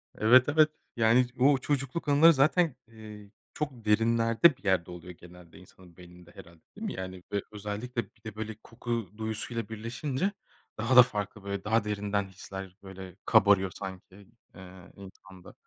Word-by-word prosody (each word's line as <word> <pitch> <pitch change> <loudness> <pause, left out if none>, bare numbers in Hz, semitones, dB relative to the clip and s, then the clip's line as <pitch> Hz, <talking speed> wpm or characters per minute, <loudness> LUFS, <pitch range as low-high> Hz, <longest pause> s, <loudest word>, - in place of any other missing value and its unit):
Evet, 125 +5 +5
evet. 155 +1 +4 0.3
Yani, 115 +2 +4
o 135 +2 +5
çocukluk 135 +3 -3
anıları 150 +4 +6
zaten, 155 +1 +2
eee, 105 -2 -12 0.2
çok 135 -7 -5
derinlerde 115 +6 +3
bir - - -27
yerde 95 -3 0
oluyor 90 +1 -10
genelde 90 0 -16
insanın 90 -1 -18
beyninde, 90 -1 -15
herhâlde, 85 -1 -14
değil 215 +2 -7
mi? - - -4
Yani, 95 -1 -7
ö 100 - 0
özellikle 105 +4 -4
bir - - -26
de, 110 -2 -8
böyle 110 0 -5
koku 115 -4 -4
duyusuyla 110 +1 -4
birleşince 130 - -3 0.5
daha 115 +4 0
da 125 - +11
farklı, 105 -3 -5
böyle, 100 -1 -4
daha 110 +1 +1
derinden 105 -1 -2
hisler, 95 0 -9
böyle, 95 -2 -10
kabarıyor 100 -4 +4
sanki, 95 -1 -9 0.4
eee, 95 0 -13
insanda. 95 -1 -14
105 Hz, 155 wpm, -28 LUFS, 95-125 Hz, 0.5 s, da